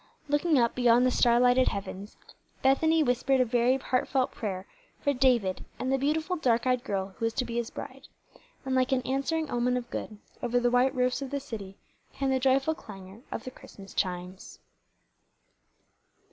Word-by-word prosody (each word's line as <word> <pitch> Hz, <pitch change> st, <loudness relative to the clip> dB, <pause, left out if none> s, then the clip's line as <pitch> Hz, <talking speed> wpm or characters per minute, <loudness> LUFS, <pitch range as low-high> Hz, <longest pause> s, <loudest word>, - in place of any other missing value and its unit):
Looking 295 Hz, +2 st, +2 dB
up 235 Hz, -2 st, +3 dB
beyond 245 Hz, 0 st, +4 dB
the 255 Hz, -, +3 dB
starlighted 245 Hz, +1 st, +4 dB
heavens, 200 Hz, +1 st, -5 dB, 0.5 s
Bethany 315 Hz, +4 st, +4 dB
whispered 265 Hz, +1 st, +1 dB
a 255 Hz, -, +4 dB
very 245 Hz, +2 st, +2 dB
heartfelt 260 Hz, 0 st, 0 dB
prayer 190 Hz, -4 st, -5 dB, 0.3 s
for 285 Hz, -, +1 dB
David 245 Hz, -8 st, +2 dB
and 260 Hz, +1 st, -1 dB
the 270 Hz, -, +1 dB
beautiful, 315 Hz, +6 st, 0 dB
dark 240 Hz, -6 st, +1 dB
eyed 250 Hz, -1 st, +1 dB
girl 195 Hz, -1 st, -2 dB
who 230 Hz, -, 0 dB
was 225 Hz, -, -1 dB
to 255 Hz, -, 0 dB
be 235 Hz, 0 st, -4 dB
his 235 Hz, 0 st, -2 dB
bride; -, -, -9 dB, 0.6 s
and 265 Hz, -, -2 dB
like 260 Hz, +1 st, +2 dB
an 260 Hz, -1 st, +1 dB
answering 275 Hz, +4 st, -1 dB
omen 245 Hz, +1 st, +1 dB
of 240 Hz, -1 st, -6 dB
good, 215 Hz, -, -5 dB, 0.2 s
over 245 Hz, 0 st, +1 dB
the 245 Hz, 0 st, +1 dB
white 250 Hz, +2 st, +3 dB
roofs 250 Hz, +1 st, +1 dB
of 275 Hz, -, -4 dB
the 280 Hz, +1 st, -2 dB
city 210 Hz, -8 st, -8 dB, 0.4 s
came 270 Hz, -1 st, -1 dB
the 260 Hz, -, +2 dB
joyful 270 Hz, +4 st, +2 dB
clangor 195 Hz, -, -12 dB
of -, -, -4 dB
the 255 Hz, -, -7 dB
Christmas 195 Hz, -5 st, -13 dB
chimes. 180 Hz, 0 st, -4 dB
250 Hz, 175 wpm, -28 LUFS, 230-270 Hz, 0.6 s, beyond